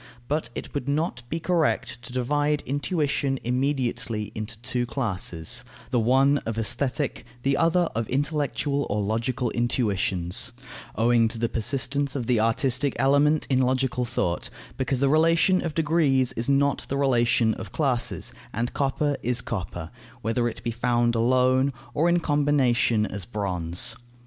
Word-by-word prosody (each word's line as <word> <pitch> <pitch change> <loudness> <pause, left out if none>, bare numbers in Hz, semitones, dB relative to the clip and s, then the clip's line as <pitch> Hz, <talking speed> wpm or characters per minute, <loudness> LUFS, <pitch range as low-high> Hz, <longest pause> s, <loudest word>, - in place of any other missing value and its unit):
But 150 -5 -1
it - - -7
would 140 -1 -3
not 145 -3 -1
be 165 - -2
correct 155 -8 0
to 120 - -9
divide 145 +4 0
intuition 145 -2 -1
immediately 125 -4 -1
into 110 +1 -5
two 120 0 -1
classes, 95 - -2 0.3
the 125 - +2
one 135 +5 +4
of 115 -3 -5
aesthetic, 125 +5 -1 0.2
the 135 0 +2
other 170 +2 +3
of 115 0 -2
intellectual 145 0 -1
or 105 - 0
logical 115 +4 -1
intuitions, 105 -3 +1 0.4
owing 115 0 +3
to 115 +1 -4
the 115 0 0
persistence 140 +4 0
of 130 -4 -2
the 120 -1 +2
artistic 125 +4 +1
element 145 +4 +3
in 130 -2 +2
logical 130 -1 +1
thought, 110 -8 -2 0.3
because 130 -1 -1
the 140 - +4
relation 165 +5 +3
of 160 -3 -3
degrees 145 -5 +2
is 120 +1 -2
not 140 0 +2
the 140 - -1
relation 120 -4 +3
of - - -8
classes, 120 - -1 0.2
and 115 +3 -2
copper 145 +1 0
is 125 0 0
copper, 90 -8 -5 0.3
whether 115 +2 +1
it 115 - -6
be 115 - -1
found 120 0 +1
alone, 130 +3 +3 0.2
or 165 +4 +2
in 175 0 +3
combination 140 -8 +2
as 100 -2 -5
bronze. 90 -1 -2
125 Hz, 150 wpm, -25 LUFS, 115-145 Hz, 0.4 s, one